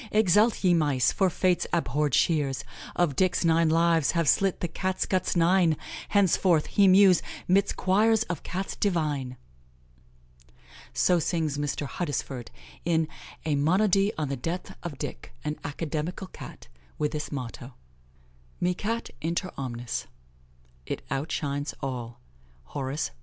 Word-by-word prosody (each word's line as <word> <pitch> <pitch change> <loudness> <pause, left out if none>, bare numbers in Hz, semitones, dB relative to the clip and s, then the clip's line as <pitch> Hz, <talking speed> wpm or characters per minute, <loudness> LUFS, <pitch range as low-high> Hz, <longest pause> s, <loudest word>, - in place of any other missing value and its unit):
Exult, 210 +2 +3
ye 180 -2 +5
mice! 145 -7 +2
for 190 - +2
Fate's 180 0 +1
abhorred 150 -4 +1
shears 145 -4 +1 0.3
Of 165 -6 +1
Dick's 185 +1 +2
nine 165 0 +4
lives 165 -2 +3
have 165 -3 +1
slit 195 +5 +3
the 175 - -1
Cat 185 +3 -2
guts 185 -1 0
nine; 170 -2 +4 0.3
Henceforth 185 -5 +3
he 200 -1 +4
mews 185 -1 +6 0.3
'midst 195 +2 +3
choirs 215 +4 +3
of 175 -8 -5
Cats 190 +2 -4
divine!" 150 -9 -1 1.5
So 180 -1 +3
sings 155 -3 -1
Mr. 145 0 -2
Huddesford, 140 -5 -4 0.4
in 160 -2 +1 0.4
a 155 - +1
"Monody 195 +7 +3
on 150 -3 -2
the 140 - -1
death 165 +8 -5
of 160 -6 -6
Dick, - - -7
an 150 0 -3
Academical 155 +5 -3
Cat," 185 - -11 0.3
with 150 -1 0
this 150 -1 -4
motto: 125 -2 -6 0.8
"Mi 180 +1 +1
Cat 225 +5 -3
inter 170 +3 -2
omnes." 120 -3 -4 1.0
Hor. 135 +3 -1 1.4
Carm., 135 - -5
Lib. 135 +3 -3
165 Hz, 130 wpm, -27 LUFS, 145-185 Hz, 1.5 s, mews